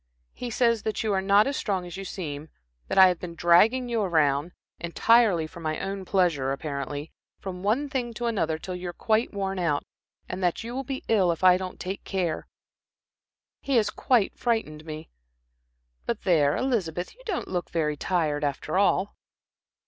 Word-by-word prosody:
He 245 - -5
says 230 -1 +2
that 215 -1 -2
you 215 -2 0
are 190 - +1
not 200 +2 +5
as 275 - -1
strong 190 -7 -1
as 175 -1 -8
you 195 0 -6
seem, 155 -5 -6 0.4
that - - -3
I 190 -1 +10
have 180 -2 0
been 170 -2 -7
dragging 210 +10 +4
you 235 -2 0
around 155 -4 +2 0.3
entirely 190 0 +3
for 170 +2 -11
my 155 -1 -2
own 195 -1 -4
pleasure, 170 -9 +1
apparently 145 +1 -4 0.3
from 180 -2 -6
one 225 +9 +1
thing 250 -3 -2
to 240 - -3
another 175 -9 0
till 180 +3 -6
you 180 0 -5
are - - -6
quite 220 +5 +1
worn 195 -2 -3
out, 155 -5 0 0.4
and 185 +1 -5
that 180 +3 0
you 235 +1 -6
will 265 +2 -3
be 270 +1 -5
ill 195 -6 +3
if 165 - -5
I 185 -1 +8
don't 185 0 -5
take 190 +2 -5
care. 180 -5 -2 1.1
He 275 - -1
has 225 -3 +3
quite 240 -6 +1
frightened 190 -11 -1
me. 155 0 -8 1.0
But - - -2
there, 150 -5 +3
Elizabeth, 185 -10 -1
you - - -20
don't 390 - -2
look 180 -2 -3
so - - -29
very 155 -3 0
tired, 150 -2 0
after 145 +5 -1
all." 200 0 +2
185 Hz, 185 wpm, -26 LUFS, 160-220 Hz, 1.1 s, I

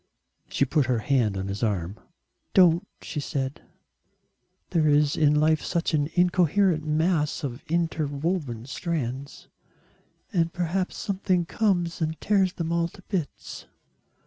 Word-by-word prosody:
She 140 - +1
put 140 0 +1
her 125 -2 +2
hand 110 -4 +1
on 95 0 -3
his 100 +1 -4
arm. 100 -3 -1 0.6
"Don't," 175 -3 +5 0.2
she 150 - -4
said, 135 -1 -3 1.1
"there 160 -2 +3
is 150 0 +3
in 150 -1 +3
life 155 0 +3
such 170 -1 -1
an 145 -1 +1
incoherent 180 -1 +3
mass 155 +1 0
of 130 -2 -5
interwoven 155 -5 -1
strands. 140 -3 -4 0.9
And 165 -3 +2
perhaps 180 +2 -2
something 185 -3 0
comes 175 -4 0
and 160 0 -1
tears 195 -3 +2
them 170 -3 -3
all 170 0 +1
to 190 +3 -16
bits." 175 -9 -4
160 Hz, 130 wpm, -26 LUFS, 140-175 Hz, 1.1 s, Don't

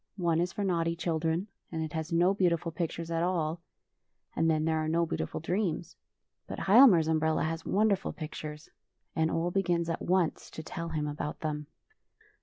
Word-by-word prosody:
One 170 -3 +2
is 175 0 -1
for 205 - -3
naughty 170 -3 +1
children, 165 +1 -1 0.3
and 160 -1 -2
it 155 - -5
has 160 0 -3
no 175 +3 +4
beautiful 175 -3 +1
pictures 165 0 -4
at 165 0 0
all, 170 -2 0 0.7
and 165 0 +2
then 155 -1 +2
there 160 -1 +1
are 155 - -1
no 170 +2 +2
beautiful 165 - -3
dreams. 175 0 -2 0.5
But - - -6
Hial 245 +8 +8
mar's 165 -6 +3
umbrella 160 0 +1
has 160 +1 -3
wonderful 200 -1 +2
pictures, 150 -1 -7 0.5
and 160 0 +2
Ole 170 +2 0
begins 175 -3 +1
at 165 - -3
once 180 -2 0
to 160 - -8
tell 165 +1 -5
him 155 -2 -2
about 150 0 -4
.them. 150 -2 -3
165 Hz, 180 wpm, -30 LUFS, 160-175 Hz, 0.7 s, Hial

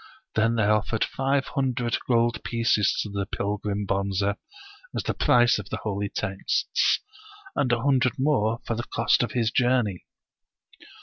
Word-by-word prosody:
Then 115 +1 +2
they 110 - +2
offered 105 +1 +1
five 135 0 0
hundred 125 -3 -1
gold 120 -1 +1
pieces 115 -4 +1
to 105 - -7
the 100 -1 -3
pilgrim 105 0 -2
Bonze, 100 0 -1 0.7
as - - -1
the - - 0
price 120 -2 +4
of 100 - -8
the - - -3
holy 100 -1 -2
texts, 95 0 0 0.5
and 125 - +1
a 120 0 +1
hundred 130 -4 +3
njore 120 -5 +1
for - - -1
the 120 - -2
cost 115 - +2
of 120 -4 -2
his 115 -2 +1
journey. 120 -8 +1
115 Hz, 150 wpm, -25 LUFS, 105-125 Hz, 0.7 s, price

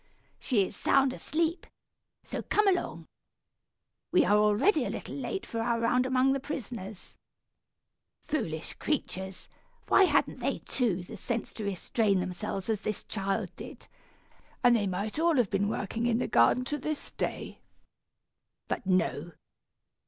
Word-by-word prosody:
"She 210 -7 +2
is - - -7
sound 270 -1 +3
asleep, 330 +5 -1 0.6
so - - -4
come 420 -1 +2
along. 370 -2 0 1.1
We - - +5
are 205 - +4
already 210 - +4
a - - -2
little - - -5
late 390 - -3
for 230 - -3
our 235 0 +1
round 250 +2 +2
among 260 +1 +3
the 275 - 0
prisoners. 230 -8 -7 1.1
Foolish 165 - -3
creatures! 190 -10 -3 0.4
Why 390 - +7
hadn't - - +1
they, - - 0
too, 205 -9 0
the - - -9
sense 235 -2 -3
to 215 - -5
restrain 200 +1 +1
themselves 185 +1 -3
as 220 -2 0
this 215 0 -3
child 195 -2 -2
did, - - -9 0.8
and 245 -1 +7
they 205 -3 +1
might 200 +8 -2
all 335 0 +3
have 240 -6 +2
been 200 0 +1
working 225 +3 -2
in 230 -1 +2
the 250 - -1
gardens, 250 - +3
to 295 - -1
this 305 +2 -4
day. - - -4 1.1
But 210 - -3
no! 175 -3 +1
225 Hz, 145 wpm, -29 LUFS, 195-265 Hz, 1.1 s, Why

